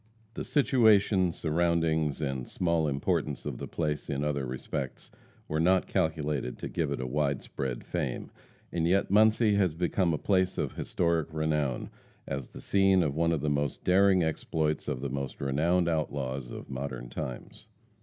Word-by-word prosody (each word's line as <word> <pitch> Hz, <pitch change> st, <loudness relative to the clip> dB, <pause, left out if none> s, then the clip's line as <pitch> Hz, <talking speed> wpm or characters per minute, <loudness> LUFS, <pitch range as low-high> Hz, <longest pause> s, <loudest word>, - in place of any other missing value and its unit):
The -, -, -4 dB
situation, 110 Hz, -, +4 dB
surroundings 80 Hz, -2 st, +1 dB
and 65 Hz, -3 st, -3 dB
small 85 Hz, -3 st, +1 dB
importance 70 Hz, -1 st, -1 dB
of 70 Hz, -5 st, -4 dB
the -, -, -5 dB
place 75 Hz, -3 st, -2 dB
in 70 Hz, 0 st, -1 dB
other 70 Hz, -3 st, -1 dB
respects, 65 Hz, +1 st, -5 dB, 0.4 s
were 75 Hz, -, -1 dB
not 90 Hz, +3 st, +3 dB
calculated 75 Hz, -5 st, -1 dB
to -, -, -5 dB
give -, -, -1 dB
it -, -, -2 dB
a 65 Hz, -, -3 dB
wide 70 Hz, +1 st, 0 dB
spread 65 Hz, -3 st, -4 dB
fame; -, -, -3 dB, 0.4 s
and 85 Hz, -1 st, 0 dB
yet 95 Hz, +2 st, +2 dB
Muncie 110 Hz, +1 st, +5 dB
has 90 Hz, -6 st, +2 dB
become 90 Hz, +1 st, +1 dB
a 80 Hz, -, 0 dB
place 95 Hz, +2 st, +1 dB
of -, -, -1 dB
historic 85 Hz, -2 st, 0 dB
renown, 75 Hz, -4 st, -1 dB, 0.4 s
as 70 Hz, -2 st, -4 dB
the -, -, -11 dB
scene 95 Hz, -2 st, +4 dB
of 75 Hz, -4 st, 0 dB
one 85 Hz, +1 st, +2 dB
of 80 Hz, -4 st, 0 dB
the 75 Hz, -, 0 dB
most 70 Hz, -1 st, -1 dB
daring 95 Hz, 0 st, +4 dB
exploits 80 Hz, -1 st, -1 dB
of 65 Hz, -, -2 dB
the 70 Hz, -, -2 dB
most 70 Hz, -1 st, -4 dB
renowned 85 Hz, +6 st, +1 dB
outlaws 70 Hz, -5 st, -2 dB
of -, -, -8 dB
modern 65 Hz, -2 st, -5 dB
times. 60 Hz, +1 st, -7 dB
80 Hz, 165 wpm, -29 LUFS, 70-90 Hz, 0.4 s, Muncie